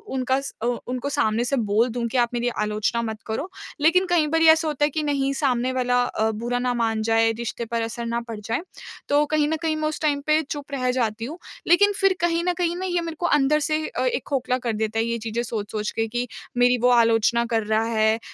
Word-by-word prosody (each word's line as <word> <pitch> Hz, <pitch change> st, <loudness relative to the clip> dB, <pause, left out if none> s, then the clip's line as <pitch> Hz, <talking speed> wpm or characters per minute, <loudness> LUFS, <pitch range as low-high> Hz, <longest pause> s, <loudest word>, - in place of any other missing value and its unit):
उनका 260 Hz, +1 st, +1 dB
स 275 Hz, -, -6 dB
अ, -, -, 0 dB, 0.2 s
उनको 255 Hz, +3 st, -3 dB
सामने 230 Hz, -5 st, +1 dB
से 275 Hz, -, 0 dB
बोल 220 Hz, +2 st, +2 dB
दूँ 235 Hz, 0 st, -3 dB
कि 250 Hz, -, -2 dB
आप 240 Hz, -1 st, +3 dB
मेरी 240 Hz, 0 st, -1 dB
आलोचना 215 Hz, +2 st, 0 dB
मत 220 Hz, -1 st, -4 dB
करो। 275 Hz, +12 st, -3 dB, 0.3 s
लेकिन 365 Hz, +5 st, +4 dB
कई 330 Hz, -4 st, +3 dB
बार 325 Hz, +2 st, +1 dB
ऐसा 320 Hz, 0 st, +2 dB
होता 295 Hz, -1 st, +1 dB
है -, -, 0 dB
कि 310 Hz, +1 st, -2 dB
नहीं 275 Hz, -2 st, 0 dB
सामने 260 Hz, -3 st, 0 dB
वाला 245 Hz, -1 st, +1 dB
अ, 220 Hz, -2 st, 0 dB
बुरा 240 Hz, +3 st, -2 dB
ना 250 Hz, 0 st, 0 dB
मान 225 Hz, -2 st, 0 dB
जाए, 225 Hz, 0 st, +3 dB
रिश्ते 235 Hz, +1 st, -5 dB
पर 230 Hz, 0 st, -2 dB
असर 235 Hz, +1 st, -4 dB
ना 235 Hz, 0 st, -1 dB
पड़ 220 Hz, -2 st, -6 dB
जाए। 225 Hz, +7 st, -2 dB, 0.5 s
तो 290 Hz, +1 st, +4 dB
कहीं 300 Hz, 0 st, +1 dB
न 320 Hz, -, 0 dB
कहीं 320 Hz, -1 st, 0 dB
मैं 310 Hz, 0 st, -1 dB
उस 310 Hz, -, -4 dB
टाइम 290 Hz, -2 st, +1 dB
पे 305 Hz, +1 st, +4 dB
चुप 290 Hz, 0 st, -7 dB
रह 255 Hz, -2 st, -1 dB
जाती 230 Hz, -3 st, -1 dB
हूँ। 310 Hz, +8 st, -7 dB, 0.3 s
लेकिन 405 Hz, +4 st, +5 dB
फ़िर 390 Hz, -1 st, +3 dB
कहीं 340 Hz, 0 st, +1 dB
न 360 Hz, -, +1 dB
कहीं 345 Hz, -1 st, 0 dB
ना 370 Hz, +1 st, -4 dB
ये 350 Hz, -2 st, 0 dB
मेरे 330 Hz, -1 st, -5 dB
को 350 Hz, -, -1 dB
अंदर 300 Hz, -2 st, +3 dB
से 310 Hz, +1 st, -1 dB
अ, -, -, -2 dB
एक 485 Hz, -1 st, 0 dB
खोखला 255 Hz, -2 st, 0 dB
कर 235 Hz, -3 st, -3 dB
देता 220 Hz, +1 st, -1 dB
है 225 Hz, -, +1 dB
ये 235 Hz, 0 st, -1 dB
चीज़ें 225 Hz, +1 st, -3 dB
सोच-सोच 210 Hz, -2 st, -4 dB
के 225 Hz, 0 st, -1 dB
कि 245 Hz, +2 st, -3 dB, 0.3 s
मेरी 245 Hz, 0 st, +4 dB
वो 250 Hz, -, +4 dB
आलोचना 235 Hz, 0 st, +3 dB
कर 225 Hz, -2 st, 0 dB
रहा 220 Hz, +1 st, +1 dB
है 220 Hz, -1 st, +2 dB
245 Hz, 245 wpm, -23 LUFS, 225-300 Hz, 0.5 s, लेकिन